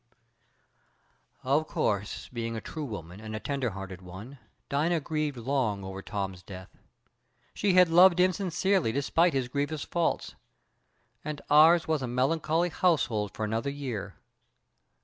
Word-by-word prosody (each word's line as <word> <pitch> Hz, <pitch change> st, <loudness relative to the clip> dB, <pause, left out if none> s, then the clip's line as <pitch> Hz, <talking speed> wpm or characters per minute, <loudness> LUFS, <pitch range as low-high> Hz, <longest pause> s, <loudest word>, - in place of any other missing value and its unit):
"Of 145 Hz, +4 st, +1 dB
course, 105 Hz, +1 st, -2 dB
being 115 Hz, -1 st, -3 dB
a -, -, -3 dB
true 155 Hz, +6 st, -6 dB
woman, 95 Hz, -, -7 dB
and 110 Hz, 0 st, -7 dB
a -, -, -3 dB
tender 135 Hz, -1 st, -2 dB
hearted 95 Hz, -2 st, -8 dB
one, 100 Hz, +10 st, -10 dB, 0.3 s
Dina 160 Hz, +4 st, +1 dB
grieved 150 Hz, -2 st, -2 dB
long 120 Hz, -5 st, -1 dB
over 95 Hz, 0 st, -6 dB
Tom's 95 Hz, -4 st, -4 dB
death. 95 Hz, -1 st, -11 dB, 0.8 s
She 200 Hz, -3 st, +1 dB
had 180 Hz, -1 st, +7 dB
loved 175 Hz, +2 st, +6 dB
him 185 Hz, 0 st, +4 dB
sincerely 190 Hz, -, +1 dB
despite 160 Hz, +6 st, +2 dB
his 130 Hz, -2 st, 0 dB
grievous 145 Hz, +3 st, -2 dB
faults, 170 Hz, -1 st, -1 dB, 0.9 s
and 150 Hz, -1 st, -4 dB
ours 160 Hz, +3 st, +6 dB
was 155 Hz, -3 st, 0 dB
a 130 Hz, -, -2 dB
melancholy 155 Hz, +7 st, +1 dB
household 125 Hz, -, +1 dB
for 110 Hz, -, -2 dB
another 115 Hz, +6 st, -1 dB
year. 135 Hz, -7 st, -5 dB
140 Hz, 140 wpm, -28 LUFS, 110-160 Hz, 0.9 s, had